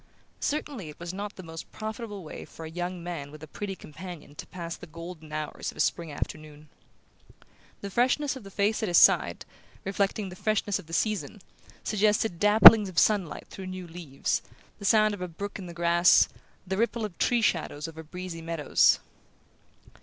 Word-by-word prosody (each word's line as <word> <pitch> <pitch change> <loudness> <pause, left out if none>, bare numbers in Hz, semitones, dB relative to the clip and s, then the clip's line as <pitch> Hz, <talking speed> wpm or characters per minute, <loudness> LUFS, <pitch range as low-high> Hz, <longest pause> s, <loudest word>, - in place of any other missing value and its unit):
Certainly 280 - -3
it 150 - -12
was 170 +1 -6
not 205 +2 -5
the 185 - -9
most 165 -1 -9
profitable 215 -2 -6
way 155 - -8
for 160 - -10
a - - -6
young 175 +1 -4
man 170 -5 -5
with 155 +1 -12
a - - -8
pretty 195 +5 -5
companion 175 -2 -10
to - - -9
pass 170 -2 -6
the 175 - -12
golden 165 -1 -10
hours 155 -1 -4
of - - -10
a - - -11
spring 170 -2 0
afternoon. 155 0 -7 1.1
The 200 - -6
freshness 260 +6 +2
of 260 - -9
the 195 - -10
face 205 +2 0
at 220 - 0
his 175 - +3
side, - - +5 0.4
reflecting 200 +1 -1
the 180 - -9
freshness 210 0 0
of - - -12
the - - -13
season, 205 -2 -1 0.4
suggested 210 -3 +1
dapplings 210 0 +9
of 180 - -12
sunlight 200 -6 +2
through 190 -1 -7
new 185 -1 -6
leaves, 165 -5 -3 0.4
the 200 - -7
sound 215 +1 +4
of 205 - -7
a 180 - -2
brook 200 +5 -6
in 185 - -7
the - - -7
grass, 170 +1 +5 0.4
the 190 +1 -2
ripple 230 0 0
of 200 -5 -7
tree 240 -2 +2
shadows 155 -5 0
over 160 0 -9
breezy 175 +1 -7
meadows... 165 -3 +3
180 Hz, 185 wpm, -28 LUFS, 165-210 Hz, 1.1 s, dapplings